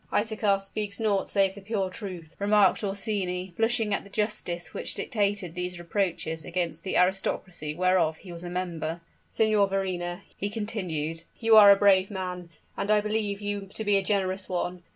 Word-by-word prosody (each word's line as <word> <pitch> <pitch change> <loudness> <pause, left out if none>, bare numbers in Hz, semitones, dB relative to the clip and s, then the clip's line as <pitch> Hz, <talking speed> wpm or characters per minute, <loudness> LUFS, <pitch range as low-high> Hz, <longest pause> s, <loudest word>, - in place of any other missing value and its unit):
"Isaachar 210 -2 +1
speaks 200 +1 -4
naught 205 -3 +1
save 195 -1 +2
the 200 - -11
pure 195 -2 -2
truth," 180 -5 -8
remarked 205 0 +4
Orsini, 195 -3 -2
blushing 225 -2 +2
at - - -1
the 200 - -14
justice 205 -5 -3
which 485 - -3
dictated 205 -6 -1
these 180 0 -4
reproaches 170 -3 -2
against 170 -2 -3
the 190 - -1
aristocracy 180 -4 0
whereof 180 -3 +2
he 180 - -12
was 170 0 -7
a 175 - -5
member. 170 -2 -3 0.3
"Signor 215 -2 +3
Verrina," 180 -2 -2
he 200 - -2
continued, 180 -8 -3 0.2
"you 225 -1 +4
are 210 -2 +10
a 200 - +9
brave 195 -1 +4
man 180 -3 -5 0.3
and 200 - -3
I 215 0 +5
believe 210 -1 -1
you 205 -1 -3
to 220 - -2
be 205 -1 +3
a 195 - +4
generous 190 -1 -1
one. 180 0 -2
195 Hz, 175 wpm, -27 LUFS, 180-205 Hz, 0.3 s, are